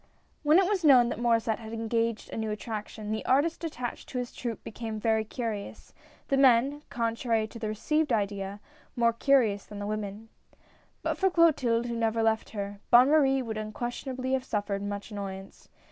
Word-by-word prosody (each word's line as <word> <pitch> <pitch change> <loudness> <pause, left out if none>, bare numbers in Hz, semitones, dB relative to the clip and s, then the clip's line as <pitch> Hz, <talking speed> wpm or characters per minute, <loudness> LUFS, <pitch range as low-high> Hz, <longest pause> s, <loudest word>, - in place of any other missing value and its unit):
W 305 +2 +5
HEN 380 - +5
it - - 0
was 390 -3 0
known 255 -5 +7
that - - -4
Maurdsset 230 -1 +1
had 220 -1 -8
engaged 230 0 -1
a - - -5
new 220 -1 -2
attraction, 215 0 -5
the 220 - -2
artists 290 +7 +2
attached 250 -7 -5
to 255 - -5
his 245 -1 -4
troupe 235 -3 -5
became 220 -1 -5
very 220 0 +2
curious, 220 -2 -6 0.3
the 275 - +1
men 270 +2 +4
— - - -40
contrary 230 -1 0
to 230 +2 -10
the 220 - -3
received 300 +8 0
idea 200 -2 -1 0.2
— - - -30
more 235 -1 +3
curious 230 -5 +3
than 210 - -10
the 205 - -4
women. 210 +1 -5 0.7
But - - -1
for 385 - +4
Clotilde 275 -10 +3
who 235 -1 -3
never 225 0 0
left 220 0 +1
her, 200 -1 -5
Bonne 250 +3 +7
Marie 270 -4 +4
would 220 -2 -4
unquestionably 250 +4 -4
have 265 -1 +1
suffered 205 -4 -2
much 205 +1 -5
annoyance. 195 -2 -7
230 Hz, 190 wpm, -28 LUFS, 215-255 Hz, 0.7 s, known